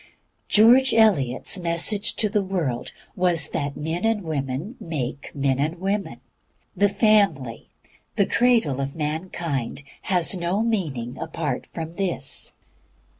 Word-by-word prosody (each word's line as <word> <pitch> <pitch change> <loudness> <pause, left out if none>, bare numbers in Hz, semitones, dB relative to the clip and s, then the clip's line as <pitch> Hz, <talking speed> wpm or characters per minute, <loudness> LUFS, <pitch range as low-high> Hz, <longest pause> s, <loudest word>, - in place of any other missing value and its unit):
George 245 +5 +6
Eliot's 190 - +3
message 175 +4 +1
to 215 - +2
the 210 0 +1
world 170 -11 -2 0.2
was 175 -4 +2
that 140 0 -3
men 160 +4 -3
and 225 -2 +1
women 150 - -3
make 140 -4 -4
men 135 -2 +1
and 160 +4 -1
women. 195 +2 -2 0.6
The 200 +2 +3
Family, 200 - +2 0.5
the 200 - +3
cradle 225 - +2
of 135 0 -4
mankind, 155 -4 -3 0.3
has 180 0 +3
no 180 +4 0
meaning 150 - -2
apart 155 -5 -3
from 165 0 -6
this. 175 -9 -2
170 Hz, 125 wpm, -24 LUFS, 140-200 Hz, 0.6 s, George